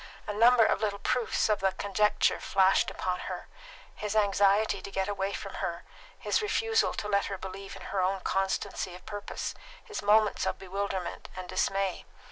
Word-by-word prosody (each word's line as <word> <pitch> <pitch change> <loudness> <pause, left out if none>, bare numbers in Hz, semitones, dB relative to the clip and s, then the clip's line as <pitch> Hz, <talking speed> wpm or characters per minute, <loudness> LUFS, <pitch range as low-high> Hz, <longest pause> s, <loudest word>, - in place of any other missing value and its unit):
A 210 - -3
number 230 +2 +6
of - - +1
little 205 -2 0
proofs 240 +3 +1
of 215 -2 +2
the 190 -1 +1
conjecture 205 +1 +2
flashed 190 0 +3
upon 180 -1 -2
her: - - -6 0.5
his 210 0 -4
anxiety 205 0 +3
to - - -7
get 190 -1 -1
away 200 -1 -1
from - - -6
her, - - -3 0.3
his - - 0
refusal 450 +1 +1
to 210 - -3
let 200 -1 +2
her 195 - -4
believe 190 +1 -8
in - - -10
her 195 - -1
own 190 +1 0
constancy 190 -1 -1
of 180 - -14
purpose, 205 -1 -5 0.3
his 430 -3 -5
moments 210 +1 +3
of - - -1
bewilderment 195 -1 -4
and 185 -1 -6
dismay. 190 +1 -1
200 Hz, 175 wpm, -29 LUFS, 190-210 Hz, 0.5 s, number